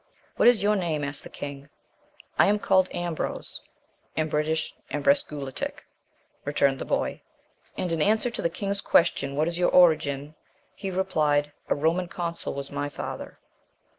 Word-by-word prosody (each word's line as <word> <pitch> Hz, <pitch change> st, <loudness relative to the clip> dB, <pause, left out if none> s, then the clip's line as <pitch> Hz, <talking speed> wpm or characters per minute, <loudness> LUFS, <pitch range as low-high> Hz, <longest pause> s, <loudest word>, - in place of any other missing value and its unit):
"What -, -, +4 dB
is 240 Hz, -4 st, +5 dB
your 210 Hz, +1 st, +4 dB
name?" 165 Hz, -6 st, -1 dB
asked 145 Hz, 0 st, -3 dB
the -, -, -9 dB
king; 140 Hz, 0 st, -7 dB, 0.7 s
"I -, -, +7 dB
am 205 Hz, +1 st, +4 dB
called 190 Hz, -2 st, +3 dB
Ambrose 175 Hz, -2 st, -3 dB, 0.5 s
(in 155 Hz, 0 st, 0 dB
British 155 Hz, +1 st, 0 dB, 0.2 s
Embresguletic)," 140 Hz, -1 st, -1 dB, 0.6 s
returned 140 Hz, -2 st, +2 dB
the -, -, -4 dB
boy; -, -, -1 dB, 0.6 s
and 180 Hz, -, -1 dB
in 165 Hz, -2 st, 0 dB
answer 220 Hz, +6 st, +3 dB
to -, -, -3 dB
the 170 Hz, -, +1 dB
king's 200 Hz, +3 st, -2 dB
question, 140 Hz, -4 st, +2 dB
"What 155 Hz, +2 st, +2 dB
is 170 Hz, +1 st, -2 dB
your 180 Hz, -, +4 dB
origin?" 150 Hz, -4 st, +4 dB, 0.4 s
he 195 Hz, -, -5 dB
replied, 155 Hz, -6 st, +1 dB, 0.2 s
"A -, -, +3 dB
Roman 165 Hz, +5 st, +1 dB
consul 170 Hz, -3 st, -4 dB
was 140 Hz, 0 st, -5 dB
my 145 Hz, 0 st, -2 dB
father." -, -, -6 dB
160 Hz, 155 wpm, -26 LUFS, 145-180 Hz, 0.7 s, I